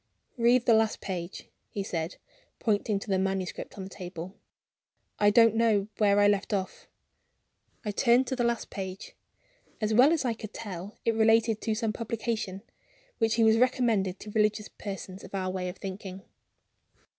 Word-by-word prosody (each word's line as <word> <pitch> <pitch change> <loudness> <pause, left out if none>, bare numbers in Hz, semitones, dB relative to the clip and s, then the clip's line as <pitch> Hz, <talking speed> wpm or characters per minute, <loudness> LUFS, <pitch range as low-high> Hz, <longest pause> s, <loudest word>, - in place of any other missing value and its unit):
"Read 240 0 +3
the 235 - +5
last 220 0 +2
page," 180 -1 -5 0.2
he 200 - -3
said, 165 -3 -3 0.4
pointing 210 -1 0
to 195 - -7
the 190 -2 +1
manuscript 190 0 -3
on 195 - -5
the 190 - -8
table; 180 -1 -7 0.9
"I 205 - +5
don't 230 +1 +6
remember 220 -2 +2
where 205 -1 +4
I 205 - +6
left 205 +1 +1
off." 190 -1 -5 1.0
I 210 - -1
turned 240 +4 +4
to 260 - -2
the 245 - 0
last 235 -1 -1
page. 190 -1 -6 0.7
As 215 0 0
well 255 +7 +6
as 320 -5 +1
I 240 - +1
could 215 -1 -9
tell, 200 -2 -7
it 230 - +3
related 225 0 +3
to 220 -2 -1
some 220 -1 -1
publication, 225 -4 -3 0.6
which 225 0 +2
he 230 - +3
was 220 0 +5
recommending 230 -7 +2
to 210 +1 -10
religious 210 0 +1
persons 195 -1 -7
of - - -8
our 185 -1 -1
way 185 -1 -3
of 180 - -8
thinking. 190 0 -7
210 Hz, 170 wpm, -28 LUFS, 190-230 Hz, 1.0 s, don't